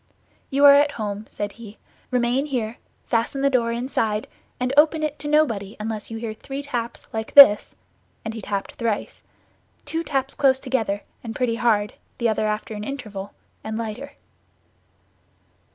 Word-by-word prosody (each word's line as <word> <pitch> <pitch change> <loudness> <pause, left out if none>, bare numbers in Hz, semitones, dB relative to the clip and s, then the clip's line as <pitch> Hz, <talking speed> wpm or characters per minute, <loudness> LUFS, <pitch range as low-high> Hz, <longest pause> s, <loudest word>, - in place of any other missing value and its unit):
"You 280 +1 +4
are 280 - +11
at 285 +1 +4
home," 210 -2 -4
said 205 -1 -4
he. 220 -1 -12 0.3
"Remain 250 +3 +1
here, 240 -5 -2 0.3
fasten 235 +3 0
the 275 0 +3
door 235 -3 +2
inside, 230 -3 -1 0.3
and 250 +1 -1
open 310 +1 +4
it 300 -1 -2
to 295 - -4
nobody 230 -10 +1
unless 215 -1 -4
you 225 - -5
hear 225 -1 -4
three 270 +5 -7
taps 240 -4 -4
like 220 0 -4
this;" 275 -8 +8 0.5
and 220 - -3
he 225 - -6
tapped 200 0 -3
thrice—two 235 +7 -5
taps 270 -3 -1
close 270 -2 +3
together 225 -7 -1 0.2
and 225 -2 -6
pretty 235 -2 0
hard, 215 -4 +2 0.2
the 235 - +1
other 215 0 0
after 215 +1 -3
an 210 0 -5
interval, 215 -7 -6 0.3
and 220 0 -4
lighter. 230 +5 -5
235 Hz, 155 wpm, -23 LUFS, 215-275 Hz, 0.5 s, are